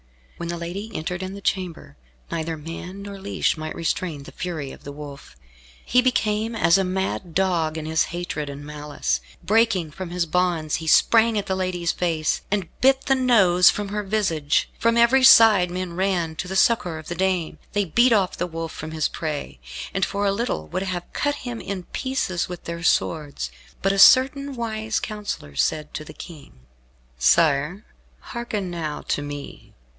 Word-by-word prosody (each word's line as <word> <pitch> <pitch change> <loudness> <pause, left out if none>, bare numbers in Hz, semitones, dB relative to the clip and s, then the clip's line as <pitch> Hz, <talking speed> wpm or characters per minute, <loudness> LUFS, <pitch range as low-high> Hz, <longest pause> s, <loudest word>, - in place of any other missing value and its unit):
When 170 - -5
the 170 - -3
lady 180 +6 -5
entered 175 +3 -3
in 190 +1 -5
the 200 - -9
chamber, 180 - -3 0.4
neither 165 -1 -2
man 170 +5 -8
nor 200 -1 -8
leash 200 +1 0
might 155 0 -5
restrain 165 -3 -2
the - - -11
fury 160 -7 -5
of - - -13
the 145 - -7
Wolf. 140 - -10 0.5
He 250 - +4
became 225 -2 0
as 195 -4 +4
a - - +2
mad 185 -2 -3
dog 170 -4 +1
in 155 - -5
his 160 0 +2
hatred 170 -4 -4
and 140 +1 -8
malice. 145 - -3 0.2
Breaking 210 -7 +2
from 185 +2 -7
his 175 0 -1
bonds 170 -2 0
he 160 - -7
sprang 225 +6 +5
at 205 - -1
the 190 - -1
lady's 180 -2 -1
face, 165 -3 0
and 195 -4 -1
bit 270 +1 +5
the 270 - +2
nose 200 -9 +5
from 205 -1 -2
her 210 +1 -2
visage. 190 -8 0
From 230 0 +2
every 240 +3 +5
side 220 -8 +8
men 180 0 -4
ran 175 -3 0
to 180 - -4
the 190 - -4
succour 190 -5 +2
of 155 - -10
the - - -3
dame. 185 -2 -1
They 205 -1 +1
beat 240 +9 +4
off 200 -5 +2
the 175 - -2
wolf 165 -1 -5
from 155 - -7
his 160 -1 0
prey, 155 -3 -5 0.3
and 195 - 0
for 200 +2 0
a 200 - +3
little 200 - -2
would - - -2
have 185 -2 -4
cut 290 0 0
him 240 -2 -4
in 195 -2 -5
pieces 260 -8 -2
with 180 -1 -7
their 170 0 -5
swords. 145 - 0 0.3
But 195 - +3
a 195 - -1
certain 270 +5 +6
wise 220 -2 -2
counsellor 205 - -5
said 150 - 0
to 155 - -5
the - - -11
King, 150 - -12 0.6
"Sire, 150 - +3 0.3
hearken 215 -6 -4
now 160 -3 -4
to - - +1
me. 145 -1 -8
180 Hz, 185 wpm, -23 LUFS, 160-205 Hz, 0.6 s, side